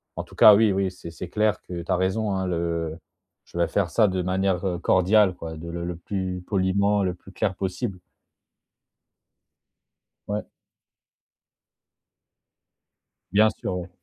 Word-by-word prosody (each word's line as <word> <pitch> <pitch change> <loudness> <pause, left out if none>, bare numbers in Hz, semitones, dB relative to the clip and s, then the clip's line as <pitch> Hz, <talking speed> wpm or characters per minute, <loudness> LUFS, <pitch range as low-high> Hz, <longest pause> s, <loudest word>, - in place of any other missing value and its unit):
en-tout-cas, 105 - +6
oui, 110 0 +4
oui 95 0 0
c'est 90 -2 -10
c'est 85 +2 -8
clair 105 +2 +1
que 85 -1 -6
tu 90 - -5
as - - +4
raison, 95 +4 0
hein, 95 -1 -1
le 85 -2 -2 0.5
je - - -10
vais 85 - +3
faire 100 -4 0
ça 110 -2 +4
de 95 -1 -1
manière, 95 0 0
heu, 90 -2 -2
cordiale, 95 +2 +4
quoi, 80 -1 -7
de 85 +2 -8
le 85 0 -4
le 90 0 -4
plus 90 +1 -4
poliment, 100 +1 +2
le 90 -1 0
plus 90 +2 -15
clair 95 0 -1
possible. 95 +1 -3 2.3
Ouais. 105 +1 -2 2.9
Bien 105 +3 +5
sûr, - - -3
ouais. 90 0 -6
95 Hz, 145 wpm, -25 LUFS, 85-100 Hz, 2.9 s, en-tout-cas